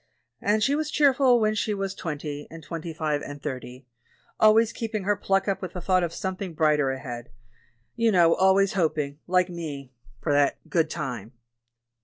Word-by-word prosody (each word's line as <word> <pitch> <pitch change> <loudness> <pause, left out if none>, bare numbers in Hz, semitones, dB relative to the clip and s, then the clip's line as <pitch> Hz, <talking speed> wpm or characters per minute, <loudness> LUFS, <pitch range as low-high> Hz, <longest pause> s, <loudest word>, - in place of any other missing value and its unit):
And 210 +1 +2
she 275 - +2
was 305 +1 -1
cheerful 270 -5 +4
when 215 -1 +2
she 215 0 -1
was 195 -1 -3
twen 160 -6 -4
ty, 145 0 -6
and 165 0 -11
twenty 165 +1 -6
five, 155 -2 -1
and 145 0 -7
thirty 130 -1 -7 0.3
— - - -36
always 220 +1 +5
keeping 220 -3 -3
her 205 +2 +2
pluck 195 0 0
up 195 - -1
with 185 -2 -6
the 180 - -5
thought 185 +1 +2
of 170 -2 -1
something 185 -1 -5
brighter 150 -3 +3
ahead, 125 -3 -6 0.7
you 230 -1 +2
know; 170 -4 +5
always 190 +1 +3
hoping, 150 -5 -1
like 180 0 +3
me, 145 -6 -7 0.3
for 145 - -1
that 145 0 +3
'good 165 -2 +1
time.' 125 - -5
170 Hz, 185 wpm, -26 LUFS, 145-200 Hz, 0.7 s, always